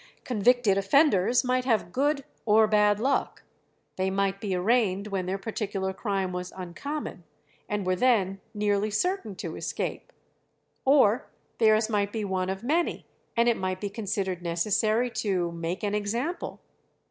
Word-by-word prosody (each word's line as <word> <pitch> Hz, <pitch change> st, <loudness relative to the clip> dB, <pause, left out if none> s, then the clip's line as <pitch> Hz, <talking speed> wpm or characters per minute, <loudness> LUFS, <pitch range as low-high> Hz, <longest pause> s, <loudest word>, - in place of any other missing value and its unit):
Convicted 240 Hz, -3 st, +3 dB
offenders 240 Hz, -, +3 dB
might 255 Hz, 0 st, +1 dB
have 225 Hz, -8 st, +1 dB
good 280 Hz, +3 st, +1 dB, 0.2 s
or 220 Hz, 0 st, +5 dB
bad 210 Hz, -1 st, +3 dB
luck; 270 Hz, +5 st, 0 dB, 0.5 s
they 190 Hz, 0 st, +1 dB
might 195 Hz, 0 st, 0 dB
be 195 Hz, -3 st, -1 dB
arraigned 200 Hz, 0 st, +2 dB
when 190 Hz, -2 st, -2 dB
their 190 Hz, +1 st, -1 dB
particular 195 Hz, -2 st, -3 dB
crime 195 Hz, -2 st, -2 dB
was 180 Hz, 0 st, -5 dB
uncommon, 185 Hz, -, -5 dB, 0.5 s
and 210 Hz, -2 st, -2 dB
were 185 Hz, 0 st, +2 dB
then 195 Hz, -4 st, +2 dB
nearly 205 Hz, 0 st, 0 dB
certain 225 Hz, -, -1 dB
to -, -, -6 dB
escape; -, -, -4 dB, 0.7 s
or 265 Hz, -5 st, +4 dB, 0.3 s
theirs 215 Hz, -1 st, +4 dB
might 205 Hz, -2 st, 0 dB
be 220 Hz, -1 st, -3 dB
one 185 Hz, -1 st, -1 dB
of 190 Hz, +3 st, -4 dB
many, 325 Hz, +7 st, 0 dB, 0.3 s
and 235 Hz, +1 st, +4 dB
it 235 Hz, -, +3 dB
might 185 Hz, 0 st, -2 dB
be 205 Hz, 0 st, -4 dB
considered 195 Hz, -4 st, -2 dB
necessary 215 Hz, +7 st, +1 dB
to 185 Hz, -6 st, -1 dB
"make 170 Hz, +3 st, -4 dB
an 205 Hz, -1 st, 0 dB
example." 235 Hz, -, -2 dB
205 Hz, 145 wpm, -27 LUFS, 190-235 Hz, 0.7 s, or